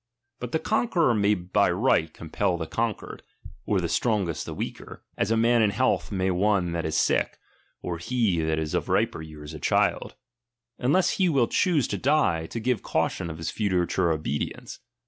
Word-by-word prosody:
But 125 -1 -6
the - - +2
conqueror 180 - +1
may 105 -1 +3
by 95 +2 +1
right 100 +10 +3
LIBERTY. 80 - -2
13 80 - -28
compel 85 +2 -1
the 80 - -4
conquered, 115 +5 -3 0.5
or - - +2
the - - -1
strongest 100 -8 -1
the - - -5
weaker, - - -7
(as - - -1
a 115 - +2
man 115 +1 +4
in 110 - +4
health 100 -6 0
may 95 -1 0
one 95 -1 +1
that 85 -1 -2
is 80 - -3
sick, - - +1 0.5
or 85 -2 -4
he 105 -3 0
that 80 0 0
is 80 -1 -3
of - - -1
riper - - +1
years 75 -1 -10
a 80 - -7
child), - - +1 0.7
uuless 150 +9 +2
he 185 -2 +3
will 135 -7 +3
choose 170 - +2
to 100 - -2
die, 115 - +2
to 115 - -5
give 120 -1 0
cautiou 85 - -1
of 80 - -6
his 80 - -4
future 95 -3 0
obedience. 75 -2 -4
100 Hz, 190 wpm, -26 LUFS, 85-120 Hz, 0.7 s, man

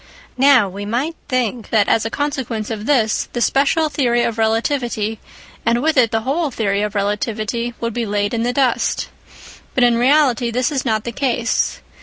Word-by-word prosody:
Now 265 -6 +5
we 195 +2 -7
might 250 +10 -2
think 245 -4 -1
that 210 -3 +3
as 225 - +2
a - - -1
consequence 255 -6 -3
of 215 -1 -5
this, 230 -7 +1
the 240 - -2
special 285 +6 +2
theory 240 -5 +1
of 230 -1 -2
relativity 225 -1 0 0.4
and 230 +1 +2
with 320 0 +2
it 250 -4 +4
the 225 0 -1
whole 290 +6 -1
theory 205 -5 -1
of 210 0 -3
relativity 215 +3 -2
would 230 -1 -3
be 235 -1 -2
laid 205 +1 -1
in 230 - 0
the 240 +1 0
dust. 255 -2 0 0.7
But 255 - +3
in 240 -1 +4
reality 255 -3 +3
this 245 +2 0
is 275 -3 -1
not 220 -3 0
the 235 - -4
case. 240 -2 -1
235 Hz, 185 wpm, -19 LUFS, 220-260 Hz, 0.7 s, Now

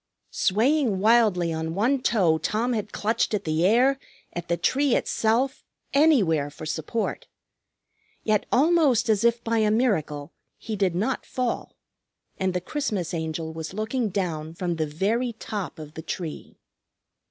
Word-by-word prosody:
Swaying 235 +2 +2
wildly 205 -5 +3
on 160 +1 -3
one 250 +7 +2
toe 175 -11 +2
Tom 225 +9 0
had 210 -2 -3
clutched 220 0 0
at 200 - -3
the 155 +1 0
air, 255 +6 +4 0.3
at 175 - -5
the 170 - 0
tree 275 +4 +2
itself, 245 +5 0 0.3
anywhere 205 - +4
for 155 +2 -9
support. 160 +8 -3 1.0
Yet, 215 -2 +1
almost 290 -5 +3
as 215 -1 +3
if 235 0 +2
by 230 0 +1
a 215 -1 +3
miracle, 160 - 0 0.2
he 220 - -5
did 190 -4 +1
not 220 +9 -1
fall. 250 -2 -3 0.6
And 190 -1 0
the 180 - 0
Christmas 205 - -3
Angel 160 -1 -3
was 160 +3 -6
looking 220 +2 -1
down 165 -5 -3
from 175 -1 -2
the 155 -1 0
very 220 +11 0
top 210 -4 -5
of 155 -1 -9
the 160 - -7
tree. 165 -1 -6
210 Hz, 150 wpm, -25 LUFS, 165-235 Hz, 1.0 s, air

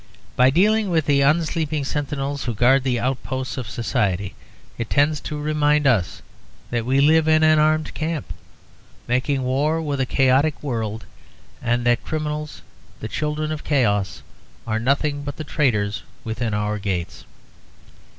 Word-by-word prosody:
By 125 +1 +5
dealing 205 +7 +3
with 160 -4 +1
the 140 -1 +3
unsleeping 155 0 +1
sentinels 140 -1 -3
who 120 -2 -2
guard 130 +5 +4
the 125 -3 0
outposts 130 0 -3
of 125 -6 -5
society, 100 -5 -1 0.5
it 115 - -3
tends 145 +1 +2
to 150 +1 -5
remind 150 0 +1
us 110 -10 +1 0.5
that 120 -1 -1
we 135 +2 +3
live 155 +2 +4
in 155 0 +4
an 155 0 +5
armed 155 0 +2
camp, 155 -1 -3 0.7
making 130 +2 0
war 145 +5 +1
with 145 -3 -2
a 130 - 0
chaotic 135 +5 +2
world, 115 -5 -3 0.6
and 120 +1 0
that 120 -1 +3
the - - -14
criminals, 150 -1 -4 0.4
the 110 - -5
children 150 +4 -2
of 155 -1 -5
chaos, 105 -9 0 0.4
are 110 -1 -1
nothing 145 +4 0
but 145 0 -6
the 155 - -4
traitors 105 -10 0 0.2
within 110 -1 -2
our 105 0 -1
gates. 95 -4 -4
140 Hz, 150 wpm, -22 LUFS, 120-150 Hz, 0.7 s, By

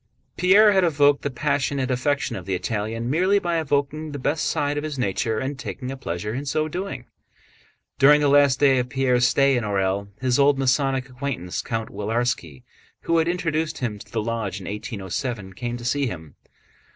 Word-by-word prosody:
Pierre 205 +4 +6
had 190 -2 +3
evoked 145 -3 +3
the 145 - -2
passionate 140 -1 -1
affection 140 +3 0
of 90 -1 -8
the 95 - 0
Italian 110 +5 -3
merely 185 +9 +3
by 170 -4 0
evoking 145 +1 -1
the - - -4
best 145 +3 -1
side 145 0 0
of 145 - -2
his 155 -2 -4
nature 110 -1 -1
and 135 +3 -3
taking 130 -2 -5
a - - -5
pleasure 105 -4 -4
in 135 +4 -3
so 155 +2 -1
doing. 155 -7 -5 0.9
During 145 +2 +7
the 145 - +2
last 140 -2 +4
days 135 -3 +4
of 125 0 -2
Pierre's 125 -2 +2
stay 140 0 +3
in 120 - 0
Orël 100 -1 -1
his 130 0 +1
old 140 0 +4
Masonic 135 0 +1
acquaintance 125 -9 -4
Count 115 -1 -4
Willarski, 105 - -2 0.4
who 165 0 +1
had 160 - +1
introduced 165 -3 -1
him 110 -6 -3
to - - -14
the 110 -2 -1
lodge 110 -4 -3
in 95 - -10
1807, 105 0 -4
came 120 +4 -4
to 120 - -9
see 140 +2 +1
him. 80 -8 -7
130 Hz, 190 wpm, -23 LUFS, 115-145 Hz, 0.9 s, During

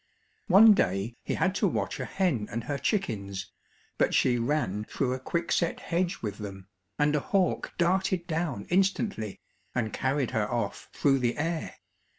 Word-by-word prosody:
One 210 +3 +8
day 100 - 0
he - - -2
had 185 - +1
to 205 - +5
watch - - -2
a - - -2
hen 150 - 0
and 115 +1 -3
her 140 +1 -3
chickens, 100 - -2 0.5
but - - +3
she 120 -1 +3
ran 115 -6 0
through 130 +1 -1
a 130 - -3
quick 170 +6 -2
set 170 - +1
hedge 175 -1 -1
with 105 -1 -4
them, 95 -2 -7 0.3
and 150 0 +2
a - - +3
hawk 190 +5 0
darted 185 0 +1
down 160 - -2
instantly, 190 - 0 0.4
and 110 -3 -1
carried 135 0 0
her 110 -3 0
off 120 -1 -3
through 135 -2 +2
the 120 -1 0
air. 160 +1 -2
140 Hz, 165 wpm, -28 LUFS, 110-175 Hz, 0.5 s, One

